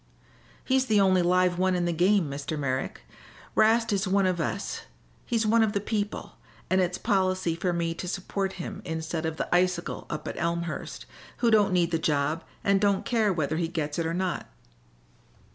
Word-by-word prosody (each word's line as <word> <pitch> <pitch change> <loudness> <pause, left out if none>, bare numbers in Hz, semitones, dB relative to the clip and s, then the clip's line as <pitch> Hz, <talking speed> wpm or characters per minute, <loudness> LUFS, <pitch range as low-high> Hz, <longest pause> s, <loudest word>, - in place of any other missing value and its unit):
"He's 265 0 +2
the 215 -3 +4
only 190 -2 +4
live 180 0 +2
one 185 0 +2
in 175 -1 0
the 175 - 0
game, 180 +1 +3
Mr. 140 +2 -4
Merrick. 135 -2 -2 0.5
'Rast 225 0 +3
is 195 0 0
one 195 +1 +3
of 180 -2 +1
us 195 +5 -3 0.5
he's 230 -2 +1
one 225 +2 +4
of 220 -2 +2
the 200 - +1
people 205 0 -3 0.3
and 185 0 +4
it's 180 0 0
policy 185 -5 +1
for 175 +2 -1
me 170 -1 -1
to 180 - -6
support 190 +1 -2
him 175 - -6
instead 160 -1 -3
of 160 0 -4
the - - -2
icicle 180 -1 0
up 150 - -5
at - - -5
Elmhurst, 170 0 -3 0.3
who 235 -2 +2
don't 210 -3 +4
need 175 -2 +2
the 165 - +1
job 150 +1 0 0.2
and 195 -1 +3
don't 200 -2 +2
care 220 -4 +2
whether 155 -3 -1
he 170 -1 0
gets 155 -2 -3
it 165 - 0
or 165 - -2
not." 185 -1 -2
180 Hz, 190 wpm, -27 LUFS, 165-200 Hz, 0.5 s, the